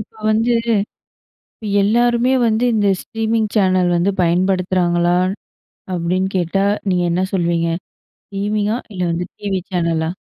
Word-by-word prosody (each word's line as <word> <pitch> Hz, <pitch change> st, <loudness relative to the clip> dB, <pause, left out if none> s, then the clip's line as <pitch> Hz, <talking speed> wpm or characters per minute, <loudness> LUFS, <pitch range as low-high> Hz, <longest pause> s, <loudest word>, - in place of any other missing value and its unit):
இப்ப 215 Hz, -, -11 dB, 0.2 s
வந்து, 225 Hz, +2 st, +2 dB, 0.9 s
இப்ப 215 Hz, -, -12 dB, 0.2 s
எல்லாருமே 240 Hz, +4 st, +2 dB, 0.2 s
வந்து 220 Hz, +1 st, +1 dB
இந்த 205 Hz, -2 st, +2 dB
ஸ்ட்ரீமிங் 225 Hz, -1 st, -1 dB
சேனல் 185 Hz, -3 st, +3 dB
வந்து 175 Hz, +4 st, +2 dB
பயன்படுத்துறாங்களா? 180 Hz, 0 st, +1 dB, 0.8 s
அப்டின்னு 180 Hz, +2 st, -1 dB
கேட்டா 180 Hz, +3 st, 0 dB, 0.3 s
நீங்க 180 Hz, -1 st, +1 dB
என்ன 185 Hz, +2 st, +1 dB
சொல்லுவீங்க? 170 Hz, -2 st, +1 dB, 0.6 s
ஸ்ட்ரீமிங்கா? 210 Hz, +2 st, -1 dB, 0.2 s
இல்ல 180 Hz, -, -3 dB
வந்து 175 Hz, +1 st, -2 dB
டிவி 195 Hz, -2 st, -2 dB
சேனலா? 165 Hz, -2 st, 0 dB
190 Hz, 115 wpm, -18 LUFS, 175-215 Hz, 0.9 s, சேனல்